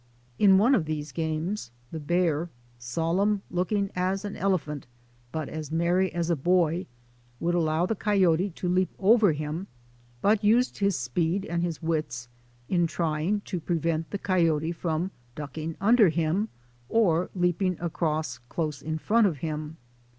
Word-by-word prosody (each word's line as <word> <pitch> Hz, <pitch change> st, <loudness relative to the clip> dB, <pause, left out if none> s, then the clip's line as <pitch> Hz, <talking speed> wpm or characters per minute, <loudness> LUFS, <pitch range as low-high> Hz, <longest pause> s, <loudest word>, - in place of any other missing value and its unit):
In 195 Hz, -2 st, +7 dB
one 230 Hz, +7 st, +5 dB
of 185 Hz, -11 st, +2 dB
these 150 Hz, -1 st, -4 dB
games 160 Hz, -, -2 dB, 0.2 s
the 160 Hz, -, -4 dB
bear, 170 Hz, +1 st, +1 dB, 0.3 s
solemn 170 Hz, -, 0 dB
looking 195 Hz, +3 st, 0 dB
as 190 Hz, +2 st, -1 dB
an 205 Hz, -, -5 dB
elephant 155 Hz, -9 st, -1 dB, 0.4 s
but 155 Hz, -1 st, -3 dB
as 155 Hz, -2 st, -6 dB
merry 175 Hz, +3 st, +2 dB
as 170 Hz, 0 st, -1 dB
a -, -, +3 dB
boy, 175 Hz, +2 st, +1 dB, 0.5 s
would 175 Hz, +1 st, 0 dB
allow 165 Hz, 0 st, +2 dB
the 225 Hz, -, 0 dB
coyote 190 Hz, -3 st, +2 dB
to 180 Hz, +1 st, -5 dB
leap 185 Hz, +1 st, +2 dB
over 210 Hz, -1 st, +5 dB
him 155 Hz, +5 st, -4 dB, 0.5 s
but 210 Hz, -, +2 dB
used 235 Hz, +5 st, +3 dB
his 200 Hz, -2 st, +2 dB
speed 165 Hz, +9 st, -1 dB
and 170 Hz, +1 st, -2 dB
his 170 Hz, -3 st, -3 dB
wits 150 Hz, -7 st, -2 dB, 0.4 s
in 175 Hz, -2 st, +2 dB
trying 165 Hz, +5 st, -1 dB
to 185 Hz, -3 st, -4 dB
prevent 165 Hz, -1 st, -1 dB
the 200 Hz, -, -3 dB
co}^ote 165 Hz, -4 st, +1 dB
from 170 Hz, +2 st, -2 dB, 0.2 s
ducking 155 Hz, +2 st, -5 dB
under 220 Hz, -1 st, +5 dB
him 170 Hz, +6 st, 0 dB, 0.4 s
or 180 Hz, -6 st, +2 dB
leaping 180 Hz, 0 st, +1 dB
across 155 Hz, -6 st, -2 dB
close 155 Hz, -4 st, -3 dB
in 160 Hz, +1 st, -3 dB
front 220 Hz, +6 st, +3 dB
of 165 Hz, -6 st, -2 dB
him. 155 Hz, 0 st, -4 dB
170 Hz, 150 wpm, -27 LUFS, 155-190 Hz, 0.5 s, In